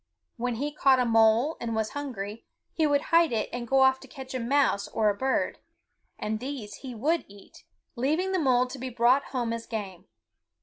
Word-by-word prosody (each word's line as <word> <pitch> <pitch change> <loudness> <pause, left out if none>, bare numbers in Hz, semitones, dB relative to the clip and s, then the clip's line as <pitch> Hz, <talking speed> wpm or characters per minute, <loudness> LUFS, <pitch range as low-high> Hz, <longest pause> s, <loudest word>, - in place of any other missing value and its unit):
When 245 0 -2
he 285 +6 -2
caught 270 -3 +4
a 250 - +2
mole 225 +5 +3
and 230 -1 -3
was 220 -1 -1
hungry, 230 -7 -6 0.3
he 315 -2 +2
would 285 -1 +2
hide 335 -3 +5
it 220 -2 -1
and 240 -1 -4
go 270 +2 +3
off 265 0 +5
to - - -13
catch 265 -3 -9
a 255 - -2
mouse 250 -4 +1
or 215 -1 +1
a - - -5
bird; 265 +4 -1 0.6
and 215 0 -3
these 245 -5 -6
he 255 -3 -8
would 315 +9 0
eat, 200 0 -16 0.3
leaving 310 +10 0
the 375 - +1
mole 255 -4 +3
to 255 +1 -8
be 260 +1 -4
brought 245 +3 +3
home 240 -3 -2
as 230 0 -6
game. 195 -5 -6
250 Hz, 205 wpm, -27 LUFS, 225-275 Hz, 0.6 s, hide